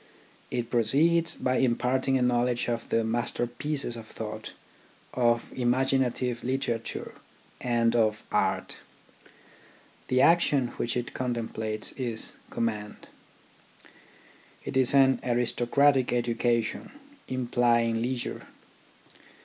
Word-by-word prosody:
It 120 -1 -3
proceeds 155 +9 +2
by 130 0 0
imparting 130 +1 +1
a 125 - +1
knowledge 120 0 +1
of 120 -1 -3
the 115 - +2
master 120 +2 -1
pieces 135 +1 -3
of 115 -1 -9
thought, 110 -1 -7 0.6
of 120 -1 +1
imaginative 125 -1 +1
literature, 120 -3 -3 0.5
and 120 -1 +2
of 110 -2 +2
art. - - 0 1.3
The 130 - +2
action 145 -5 +4
which 120 +1 -1
it 120 - -4
contemplates 110 -3 -3
is 120 -4 -4 0.2
command. 105 -2 -4 1.6
It - - -5
is 130 +1 +3
an 135 -2 +5
aristocratic 125 +3 +2
education 120 - 0 0.3
implying 120 -2 +1
leisure. 125 0 -3
120 Hz, 100 wpm, -28 LUFS, 115-130 Hz, 1.6 s, an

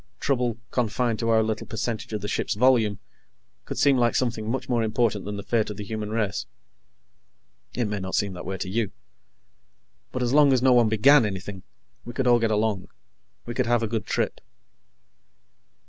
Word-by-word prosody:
Trouble, 125 -4 0
confined 120 -1 0
to 115 - -1
our 110 -1 +4
little 110 0 -3
percentage 110 0 -4
of 105 -2 -3
the 105 - -4
ship's - - -1
volume, 115 -3 +3 0.7
could - - -6
seem 140 -2 +4
like 120 -1 +2
something 115 -4 -1
much 130 +3 -2
more 120 -2 +1
important 110 -2 0
than 105 0 -4
the 100 - -6
fate 110 +1 0
of 105 - -6
the 105 - -5
human 105 0 -5
race. 105 -3 -2 1.3
It 120 - 0
may 105 -1 -3
not 95 0 -4
seem 100 -2 0
that 90 - -8
way 95 +1 -4
to 95 - -4
you. 105 +1 -2 1.2
But 125 - -2
as 120 +1 0
long 145 -2 +6
as 125 - +2
no 130 -1 +6
one 120 -3 +4
began 130 +6 +6
anything, 95 -1 -5 0.4
we 120 - -8
could 135 - -1
all 120 -1 +5
get 115 -1 +1
along. 105 -3 0 0.6
We 120 - -5
could 125 0 0
have 120 -1 +2
a - - 0
good 110 -1 -3
trip. - - -1
115 Hz, 195 wpm, -25 LUFS, 105-120 Hz, 1.3 s, long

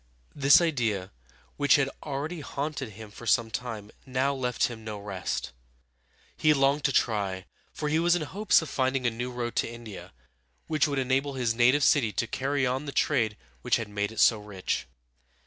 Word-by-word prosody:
This 140 +3 +6
idea, 115 - 0 0.5
which 145 -2 +5
had 145 -2 +2
already 150 +4 -4
haunted 140 -2 -4
him 110 +1 -11
for 120 +3 -10
some 115 -2 +3
time, 110 -4 -5
now 130 +2 0
left 125 -3 -2
him 115 -2 -1
no 110 -1 -5
rest 95 -9 -4 0.8
He 155 -1 +3
longed 140 +1 +2
to 140 - +3
try, 100 -7 0 0.3
for 150 - -4
he 155 +2 +2
was 175 +1 +4
in 175 - -1
hopes 200 +2 +2
of 160 - -7
finding 130 -1 0
a 120 - +3
new 120 +2 -4
road 120 -1 -4
to - - +1
India, 115 -4 -9 0.5
which 155 -1 +2
would 140 -1 -2
enable 135 +2 0
his 120 -3 0
native 125 +5 +4
city 130 -6 +4
to 115 - 0
carry 135 +3 -1
on 130 +3 -1
the 140 - -4
trade 115 -8 +1 0.2
which - - +2
had 115 -3 -3
made 105 0 -2
it 110 - -7
so 110 - +5
rich. 95 -10 -3
125 Hz, 185 wpm, -28 LUFS, 110-145 Hz, 0.8 s, This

